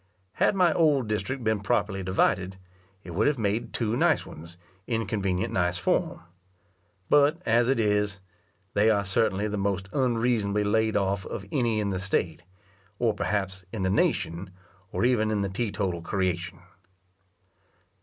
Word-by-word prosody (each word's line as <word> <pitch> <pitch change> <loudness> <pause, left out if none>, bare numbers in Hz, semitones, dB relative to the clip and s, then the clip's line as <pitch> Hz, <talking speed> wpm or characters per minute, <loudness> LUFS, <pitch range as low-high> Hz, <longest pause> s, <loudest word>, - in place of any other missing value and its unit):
Had - - +4
my 180 -4 +4
old 145 -7 +3
district 120 +5 -2
been 110 -1 +1
properly 100 -2 0
divided, 95 0 0 0.5
it 85 - -9
would 100 +6 +1
have 145 -2 +2
made 110 0 -1
two 115 -1 -1
nice - - +2
ones, 85 +2 -12 0.3
in 115 -2 -1
convenient 95 -3 -1
nice 90 -1 +1
form. - - 0 0.9
But 145 +3 +4
as 120 +2 +3
it 135 - +2
is, 105 -2 +1 0.5
they 105 +2 +4
are 100 -2 +2
certainly 100 +1 +1
the 105 -1 -3
most 100 0 -1
unreasonably 115 -5 +1
laid 110 +1 +1
off 100 -1 0
of 100 - -6
any 120 -5 +1
in 100 -1 -1
the 95 - -2
state, 90 -4 -1 0.6
or 115 -1 +1
perhaps 95 -2 -2
in 105 -4 -3
the 95 - +1
nation, 85 -1 0 0.4
or - - 0
even 115 -4 +2
in 105 -2 0
the 100 - -1
te 105 +3 -2
total 95 -4 -2
creation. 90 -1 -2
105 Hz, 155 wpm, -27 LUFS, 95-115 Hz, 0.9 s, Had